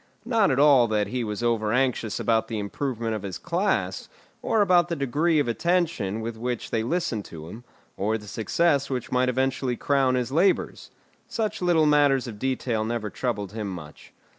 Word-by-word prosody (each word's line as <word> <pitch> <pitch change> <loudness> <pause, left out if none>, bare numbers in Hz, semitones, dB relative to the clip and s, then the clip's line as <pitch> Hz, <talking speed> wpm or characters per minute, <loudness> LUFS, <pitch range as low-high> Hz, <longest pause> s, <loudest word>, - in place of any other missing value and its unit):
Not 230 -4 +3
at 135 - +1
all 140 -4 +6
that 105 -2 0
he 125 +2 -2
was 105 +1 -4
over 110 -3 +1
anxious 120 -3 0
about 110 -1 +1
the 115 - -4
improvement 115 +2 -3
of 110 - -3
his 95 -3 -5
class, 185 - -1 0.3
or 225 -2 +1
about 175 -3 +3
the 170 - -1
degree 150 +4 +1
of 145 - +2
attention 120 - 0
with 115 0 -5
which 120 +1 -4
they 115 - +1
listened 120 - -1
to 80 -1 -10
him, 115 +6 -10 0.3
or 110 +3 0
the 105 - -12
success 140 - +1
which 125 -3 -4
might 125 0 +2
eventually 130 0 0
crown 135 -2 +2
his 125 0 -1
labours. 170 +7 +1 0.4
Such 220 -4 -3
little 170 -3 +3
matters 145 -3 +4
of 110 -4 -8
detail 125 -3 -1
never 110 -2 -3
troubled 105 -6 -3
him 105 -2 -4
much. 80 -6 -10
125 Hz, 185 wpm, -25 LUFS, 110-145 Hz, 0.4 s, all